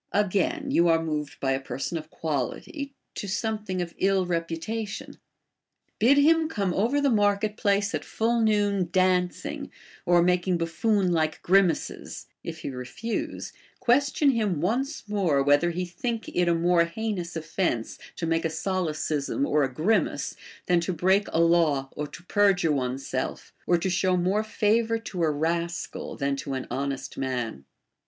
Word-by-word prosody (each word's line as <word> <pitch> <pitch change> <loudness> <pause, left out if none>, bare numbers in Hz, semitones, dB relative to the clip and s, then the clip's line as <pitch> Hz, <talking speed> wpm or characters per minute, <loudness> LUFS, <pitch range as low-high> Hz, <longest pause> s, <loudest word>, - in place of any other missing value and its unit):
Again, 210 - +1
you 175 -8 +4
are 165 -1 +4
moved 150 -3 -3
by 135 - 0
a 135 - +1
per 135 - -6
son 140 - -3
of 155 0 -12
quality 165 - -3 0.2
to 200 - -5
something 205 -2 -2
of 170 - -9
ill 195 -1 +2
reputation: 175 +5 -4 0.8
bid 260 +6 +5
him 320 +2 +4
come 200 - -1
over 235 +10 +1
the 285 -2 +2
market 205 -1 +2
place 200 -2 +1
at - - -2
full 230 +1 0
noon 205 -4 +2
dancing, 185 -1 0 0.4
or 175 -1 +5
making 180 0 +2
buffoon 185 +3 +1
like 155 -2 0
grimaces; 185 -2 +1 0.2
if 160 -1 -6
he - - -4
refuse, 125 - -4 0.3
question 280 +3 +3
him 210 - 0
once 250 - -1
more, 180 -10 +2
whether 145 +5 +4
he 180 +2 -2
think 225 +6 -4
it 180 -1 +1
a 170 - +3
more 170 0 +3
heinous 180 -1 -4
offence 155 - -2 0.2
to 165 - -3
make 165 0 +1
a 165 - +1
solecism 160 - -1
or 150 - +2
a 135 -2 +1
grimace, 175 - 0 0.3
than 175 -1 +3
to 170 +2 -2
break 190 +5 +2
a 165 - +1
law 165 -5 +3
or 150 - -3
to 170 - -12
perjure 190 -4 +3
one's 135 -1 -2
self, 130 - -4
or 175 - +4
to 185 +2 -1
show 180 +1 +2
more 190 +5 +1
favor 220 +1 +1
to 215 -6 -6
a 160 - +3
rascal 170 +3 -2
than 140 0 -1
to 135 0 -4
an 130 - -4
honest 140 0 -3
man. 120 - -3
180 Hz, 160 wpm, -26 LUFS, 160-210 Hz, 0.8 s, bid